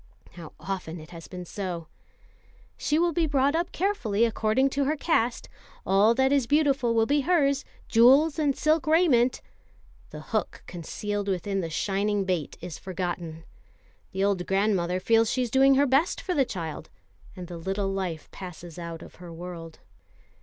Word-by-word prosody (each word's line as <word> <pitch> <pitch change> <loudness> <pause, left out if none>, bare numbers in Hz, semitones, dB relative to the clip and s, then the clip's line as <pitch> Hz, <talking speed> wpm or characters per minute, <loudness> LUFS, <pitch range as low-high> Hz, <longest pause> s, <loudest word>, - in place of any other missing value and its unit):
How 170 -3 -11
often 180 -4 -5
it 155 +2 -13
has 165 -2 -10
been 180 -1 -8
so! 175 -3 -5 0.9
"She 300 - 0
will 340 +1 +2
be 330 -1 +1
brought 280 -1 +2
up 340 +1 -1
carefully 235 - +1
according 230 +4 +1
to 280 0 0
her 300 +3 +1
caste. 250 -6 0 0.4
All 205 +4 +4
that 265 +1 +3
is 275 -4 +2
beautiful 280 -5 +2
will 225 -1 +4
be 285 +4 +2
hers, 280 -3 +2 0.2
jewels 270 +7 +5
and 290 -3 +1
silk 310 +1 +1
raiment." 300 -7 +3 0.7
The - - -9
hook - - -2
concealed 205 +4 -4
within 195 +1 -1
the 165 - -4
shining 200 +4 0
bait 180 -5 -2
is 175 -2 -7
forgotten. 175 -3 -5 0.7
The 190 +1 -1
old 195 -3 0
grandmother 190 -3 +1
feels 225 +3 +3
she 255 - 0
is 240 - -4
doing 270 +1 +5
her 280 +2 +4
best 275 +5 +2
for 365 - -3
the 275 -5 +3
child, 165 -8 -6 0.5
and 180 -2 -7
the 175 -1 -7
little 195 +3 -2
life 185 -5 -3
passes 175 -2 -9
out 170 -1 -7
of - - -14
her 175 -1 -10
world. 165 -1 -9
205 Hz, 165 wpm, -26 LUFS, 180-275 Hz, 0.9 s, jewels